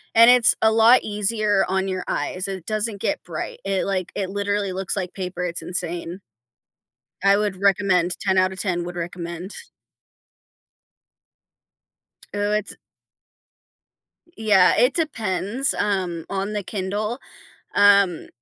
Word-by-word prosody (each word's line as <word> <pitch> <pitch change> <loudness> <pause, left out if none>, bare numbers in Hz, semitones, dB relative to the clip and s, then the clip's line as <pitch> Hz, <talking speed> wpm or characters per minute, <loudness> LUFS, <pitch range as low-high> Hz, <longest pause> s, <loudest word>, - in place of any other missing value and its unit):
and 230 +2 +8
it's 245 -4 +6
a 220 - +5
lot 225 +3 +5
easier 210 0 +1
on 190 +1 0
your 185 -1 -3
eyes. 185 +1 -2
It 190 -3 -6
doesn't 215 -1 -2
get - - -2
bright, 165 -3 -6
it, 195 -1 -1
like, 185 -3 -2
it 190 -2 -3
literally 200 -1 -2
looks 185 -4 -2
like 185 -3 -4
paper, 180 -2 -4
it's 170 -1 -4
insane. 175 0 -4 1.0
I 200 0 +5
would 205 -2 -2
recommend 185 -3 +2
10 190 -1 +1
out 185 0 +2
of 190 - -9
10 175 -4 -1
would 175 0 -7
recommend. 175 +2 -6 2.8
Ooh, 205 0 -1
it's 210 -1 -2 1.6
Yeah, 200 -4 +4
it 250 +3 +4
depends, 230 - -1
um, 185 -5 -1
on 195 +1 -3
the 205 -1 -3
Kindle, 210 +5 -3 0.6
um, 200 -4 +4
195 Hz, 130 wpm, -22 LUFS, 185-210 Hz, 2.8 s, and